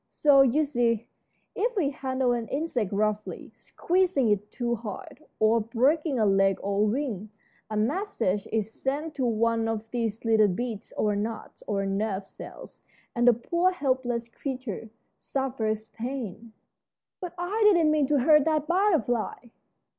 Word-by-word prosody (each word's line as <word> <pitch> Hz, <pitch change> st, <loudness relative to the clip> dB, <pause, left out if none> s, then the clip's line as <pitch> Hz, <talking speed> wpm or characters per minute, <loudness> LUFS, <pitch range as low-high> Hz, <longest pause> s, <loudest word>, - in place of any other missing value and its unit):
So, 285 Hz, -2 st, +5 dB
you 270 Hz, +4 st, +4 dB
see, 235 Hz, -5 st, 0 dB, 0.5 s
if 475 Hz, +4 st, -1 dB
we 305 Hz, -9 st, +1 dB
handle 260 Hz, -2 st, -1 dB
an 235 Hz, -2 st, -1 dB
insect 265 Hz, -, -2 dB
roughly, 210 Hz, +1 st, -2 dB
squeezing 355 Hz, -9 st, 0 dB
it 210 Hz, 0 st, 0 dB
too 240 Hz, -2 st, -2 dB
hard, 280 Hz, -, -7 dB, 0.2 s
or 220 Hz, +2 st, +4 dB
breaking 265 Hz, +7 st, +1 dB
a 220 Hz, -, +3 dB
leg 195 Hz, -1 st, +3 dB
or 200 Hz, 0 st, -1 dB
a 210 Hz, -, +4 dB
wing, 220 Hz, -5 st, -3 dB, 0.4 s
a 215 Hz, -, -3 dB
message 225 Hz, -, -1 dB
is 220 Hz, -1 st, -1 dB
sent 290 Hz, +6 st, -3 dB
to 265 Hz, -4 st, -1 dB
one 230 Hz, 0 st, +1 dB
of 225 Hz, -1 st, -3 dB
these 230 Hz, -2 st, -2 dB
little 220 Hz, -2 st, +5 dB
beads 220 Hz, +2 st, -4 dB
or 210 Hz, -1 st, +1 dB
knots 215 Hz, +2 st, -5 dB
or 195 Hz, -1 st, -1 dB
nerve 195 Hz, 0 st, -1 dB
cells, -, -, -12 dB, 0.3 s
and 240 Hz, 0 st, +2 dB
the 245 Hz, -, +8 dB
poor, 340 Hz, +10 st, +1 dB
helpless 255 Hz, -8 st, -1 dB
creature 250 Hz, -4 st, -6 dB, 0.3 s
suffers 225 Hz, -5 st, -2 dB
pain." 230 Hz, -3 st, -6 dB, 0.7 s
"But 355 Hz, -2 st, -6 dB
I 355 Hz, +5 st, -2 dB
didn't 345 Hz, -7 st, +5 dB
mean 300 Hz, -3 st, +2 dB
to 290 Hz, -2 st, +2 dB
hurt 300 Hz, +2 st, +6 dB
that 310 Hz, -2 st, +1 dB
butterfly!" 315 Hz, -, +1 dB
240 Hz, 150 wpm, -27 LUFS, 215-290 Hz, 0.7 s, the